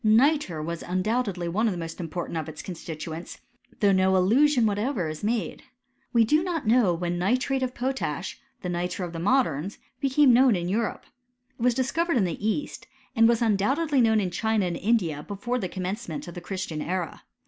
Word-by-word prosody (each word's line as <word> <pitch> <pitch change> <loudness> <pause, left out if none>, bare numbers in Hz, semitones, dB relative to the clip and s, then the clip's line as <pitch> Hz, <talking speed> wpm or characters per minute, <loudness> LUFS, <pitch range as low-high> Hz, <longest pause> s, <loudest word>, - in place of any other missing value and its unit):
Nitre 220 - +3
was 170 +1 -4
undoubt 215 +8 0
edly 180 -3 -3
one 210 +7 +1
of - - +1
the - - -5
most 165 0 -6
important 170 0 -4
of 160 -1 -3
its 155 - -8
constituents; 165 -1 -7 0.4
though 200 -1 +5
no 190 0 +3
allusion 240 +7 +4
whatever 210 - 0
is 155 0 -5
ever 205 - -2
made. 220 -7 -2 0.5
We 235 -1 +5
do 305 +8 +3
not 340 -6 -2
know 225 -3 +4
when 175 +1 -2
nitrate 255 +7 +1
of 255 -1 -2
potash, 245 - -3 0.2
the 180 - -2
nitre 180 +1 -2
of 175 - -8
the 165 - -5
moderns, 195 - +1 0.2
became 275 -1 +4
known 250 -2 +5
in 175 -1 -2
Europe. 215 +4 -1 0.5
It - - -9
was 245 0 +3
discovered 330 +5 +1
in 215 - +3
the 175 +2 -4
east; 275 +6 -3 0.3
and 225 -1 +6
was 235 0 +2
undoubtedly 265 +8 +2
known 220 -2 +4
in 185 -3 -1
China 220 0 +1
and 175 -1 -2
India 180 -9 +1
before 210 +8 -3
the 185 - -3
commencement 185 -3 -4
of 175 - -7
the 175 - -7
Christian 175 -4 -4
era. 180 -1 -3
205 Hz, 195 wpm, -26 LUFS, 175-245 Hz, 0.5 s, and